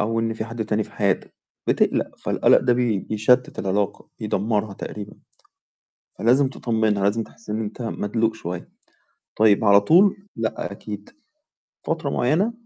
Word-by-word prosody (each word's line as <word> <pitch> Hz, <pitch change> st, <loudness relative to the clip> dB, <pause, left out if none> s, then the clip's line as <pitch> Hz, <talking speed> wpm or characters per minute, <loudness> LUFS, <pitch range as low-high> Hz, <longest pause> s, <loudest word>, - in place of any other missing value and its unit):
أو 115 Hz, +2 st, 0 dB
إن 115 Hz, 0 st, -1 dB
في 110 Hz, -, -4 dB
حد 115 Hz, -1 st, -4 dB
تاني 105 Hz, 0 st, 0 dB
في -, -, -17 dB
حياتك 100 Hz, -3 st, -1 dB, 0.3 s
بتقلق -, -, +1 dB
فالقلق -, -, +4 dB
ده 125 Hz, -, +2 dB
بي 120 Hz, -4 st, +1 dB
بيشتت 110 Hz, +6 st, +1 dB
العلاقة، 100 Hz, +1 st, -1 dB
يدمرها 105 Hz, -1 st, -1 dB
تقريبًا. 105 Hz, +1 st, -7 dB, 1.0 s
فلازم 130 Hz, +4 st, +4 dB
تطمنها 110 Hz, -5 st, 0 dB
لازم 110 Hz, +3 st, +2 dB
تحس 115 Hz, 0 st, -11 dB
إن 110 Hz, +1 st, -1 dB
أنت 110 Hz, +3 st, -5 dB
مدلوق 110 Hz, 0 st, -1 dB
شويّة، 90 Hz, -5 st, -6 dB, 0.7 s
طيب 110 Hz, 0 st, +4 dB
على 100 Hz, -1 st, +7 dB
طول، 185 Hz, -, +5 dB, 0.2 s
لأ، 110 Hz, -2 st, -3 dB
أكيد 105 Hz, 0 st, -8 dB, 0.8 s
فترة 160 Hz, -4 st, -1 dB
معيّنة 170 Hz, -, +1 dB
110 Hz, 140 wpm, -23 LUFS, 105-120 Hz, 1.0 s, على